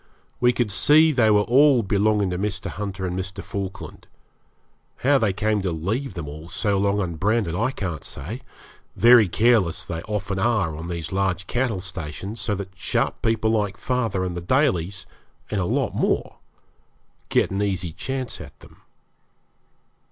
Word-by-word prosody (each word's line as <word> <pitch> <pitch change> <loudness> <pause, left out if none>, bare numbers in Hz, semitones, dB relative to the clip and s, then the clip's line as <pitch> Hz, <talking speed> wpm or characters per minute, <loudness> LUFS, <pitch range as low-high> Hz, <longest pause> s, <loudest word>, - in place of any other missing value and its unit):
We 125 0 +4
could 120 -3 -1
see 150 +11 +5
they 120 -6 +3
were 105 -1 +5
all 130 +1 +5
belonging 100 0 +1
to 90 - -2
Mr. 100 0 -3
Hunter 100 -2 -4
and 90 0 -3
Mr. 95 +1 -5
Falkland. 100 -1 -6 1.0
How 140 0 +5
they 110 -5 +2
came 105 +2 0
to 95 -2 -1
leave 95 - -3
them 85 -4 -5
all 75 +3 -9
so 100 +1 0
long 100 +1 +1
unbranded 95 +1 0
I 115 +8 +1
can't 90 - -4
say. - - -6 0.5
Very 120 -3 +7
careless 110 -5 +2
they 85 -1 -4
often 105 -2 -2
are 100 -7 +1
on 80 +2 -6
these 85 -3 -4
large 95 -1 0
cattle 120 -4 -1
stations, 95 +3 -6
so 105 - 0
that 95 -1 -7
sharp 90 - -1
people 110 -1 +1
like 105 -3 0
father 115 -7 -1
and 90 -1 -3
the 85 - -4
Dalys, 95 - +1 0.5
and 105 -2 0
a - - 0
lot - - 0
more, - - -1 0.9
get - - +2
an 100 +1 -1
easy 95 -5 -1
chance 130 +5 -4
at - - -12
them. - - -16
100 Hz, 165 wpm, -23 LUFS, 90-115 Hz, 1.0 s, Very